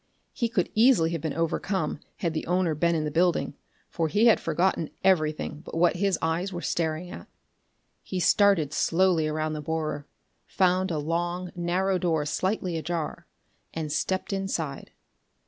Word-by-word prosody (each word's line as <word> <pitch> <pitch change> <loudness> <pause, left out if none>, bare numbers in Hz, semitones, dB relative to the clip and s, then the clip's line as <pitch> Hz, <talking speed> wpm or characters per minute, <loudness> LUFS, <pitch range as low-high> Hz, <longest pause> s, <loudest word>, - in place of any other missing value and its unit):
He 235 -4 -1
could 185 -6 0
easily 220 -8 +4
have 165 -3 -3
been 155 -2 -3
overcome, 165 0 -1 0.2
had 170 -3 -1
the 155 - -3
owner 180 -2 +1
been 170 +3 +1
in 155 - 0
the 150 - -2
building, 170 -1 +1 0.3
for 165 -2 -1
he 210 +8 +2
had 230 - +6
forgotten 165 0 0
everything 155 -4 +1
but 165 - -7
what 175 +1 +3
his 195 -2 +1
eyes 165 +4 0
were 175 -1 -5
staring 165 +1 -2
at. - - -9 0.7
He 185 - -4
started 180 -6 +3
slowly 170 -2 +2
around 155 0 -2
the 155 - -4
borer, 155 -1 -3 0.4
found 185 0 +2
a 165 - -1
long 175 +4 -2
narrow 180 +2 0
door 160 -5 0
slightly 185 +2 -1
ajar, 165 0 -4 0.5
and 155 -2 -3
stepped 190 +5 -1
inside. 170 -8 -3
170 Hz, 160 wpm, -27 LUFS, 155-185 Hz, 0.7 s, had